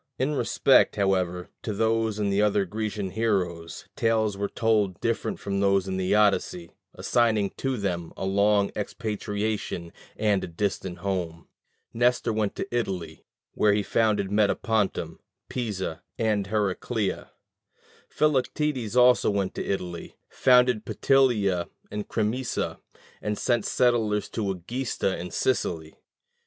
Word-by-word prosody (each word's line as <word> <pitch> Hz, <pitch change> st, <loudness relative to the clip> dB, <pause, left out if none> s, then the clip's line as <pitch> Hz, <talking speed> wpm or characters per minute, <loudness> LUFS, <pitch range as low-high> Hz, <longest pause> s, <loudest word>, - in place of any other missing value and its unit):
In 135 Hz, +3 st, 0 dB
respect, 145 Hz, -, +3 dB
however, 90 Hz, -3 st, 0 dB
to 110 Hz, -, -3 dB
these 110 Hz, 0 st, +1 dB
and 100 Hz, -2 st, 0 dB
other 105 Hz, -1 st, +2 dB
Grecian 105 Hz, 0 st, -3 dB
heroes, 90 Hz, -7 st, -2 dB
tales 110 Hz, -2 st, +1 dB
were 100 Hz, +1 st, -2 dB
told 105 Hz, -5 st, +1 dB
different 115 Hz, 0 st, -1 dB
from 100 Hz, 0 st, -2 dB
those 100 Hz, -1 st, +2 dB
in 95 Hz, 0 st, -2 dB
the 95 Hz, +2 st, +1 dB
Odyssey, 95 Hz, -4 st, +1 dB, 0.2 s
assigning 110 Hz, -5 st, +1 dB
to 135 Hz, -1 st, -1 dB
them 90 Hz, -5 st, -3 dB
a -, -, -3 dB
long 100 Hz, +1 st, +3 dB
expatriation 105 Hz, -4 st, -3 dB, 0.2 s
and 105 Hz, -3 st, +1 dB
a -, -, -3 dB
distant 90 Hz, 0 st, -3 dB
home. 85 Hz, -4 st, -3 dB, 0.5 s
Nestor 120 Hz, -1 st, +2 dB
went 105 Hz, -2 st, -1 dB
to 195 Hz, -, -4 dB
Italy, 90 Hz, -9 st, -3 dB, 0.3 s
where 105 Hz, -1 st, +3 dB
he 105 Hz, 0 st, +1 dB
founded 105 Hz, -2 st, +1 dB
Metapontum, 105 Hz, -5 st, 0 dB, 0.3 s
Pisa, 100 Hz, -9 st, -3 dB, 0.2 s
and 105 Hz, -3 st, 0 dB
Heracleia: 105 Hz, 0 st, -1 dB, 0.8 s
Philoctetes 140 Hz, -4 st, 0 dB
also 125 Hz, 0 st, +5 dB
went 100 Hz, -2 st, -1 dB
to -, -, -4 dB
Italy, 90 Hz, -3 st, -4 dB
founded 125 Hz, -3 st, +4 dB
Petilia 110 Hz, -12 st, +2 dB, 0.2 s
and 105 Hz, 0 st, -4 dB
Crimisa, 115 Hz, +3 st, -2 dB, 0.4 s
and 105 Hz, 0 st, -2 dB
sent 120 Hz, -4 st, +1 dB
settlers 115 Hz, -4 st, +1 dB
to 105 Hz, -4 st, -2 dB
Egesta 95 Hz, +2 st, -2 dB
in 90 Hz, +1 st, -5 dB
Sicily. 80 Hz, -8 st, -1 dB
105 Hz, 125 wpm, -26 LUFS, 95-115 Hz, 0.8 s, also